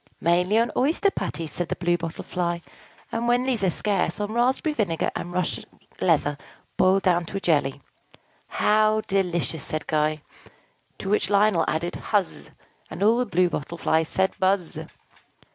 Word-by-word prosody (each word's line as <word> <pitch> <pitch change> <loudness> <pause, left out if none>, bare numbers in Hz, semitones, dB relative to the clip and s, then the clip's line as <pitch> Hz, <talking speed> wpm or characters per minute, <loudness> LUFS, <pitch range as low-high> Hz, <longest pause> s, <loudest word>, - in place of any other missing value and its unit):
"Mainly 180 +5 +2
on 230 +1 +2
oyster 325 +9 +2
patties," 165 - -4
said 175 - -3
the - - -1
Blue 175 0 +1
Bottle 165 -1 -5
Fly; 175 -1 -2 0.5
"and, 230 +1 -2
when 245 +1 +3
these 250 -6 -1
are 190 - +4
scarce, 205 +4 0
on 205 +1 -3
raspberry 260 +6 +1
vinegar 190 - -1
and 175 - -4
Russian 180 -1 -2 0.4
leather 145 0 +2 0.4
boiled 190 +1 +3
down 175 -2 +2
to 195 - -4
a - - -1
jelly." 145 -6 +1 0.7
"How 215 0 +2
delicious!" 175 -6 -1
said 155 -1 -4
Guy. 155 0 0 0.7
To 190 - -5
which 210 -3 +1
Lionel 200 -4 +3
added, 170 +3 -1
"Huzz!" 205 -3 -1 0.4
And - - -4
all 225 +3 +4
the 250 - 0
Blue 185 -2 +3
Bottle 150 +4 -4
Flies 160 -1 +1
said, 190 0 +1
"Buzz!" 190 -3 +1
185 Hz, 160 wpm, -25 LUFS, 170-215 Hz, 0.7 s, are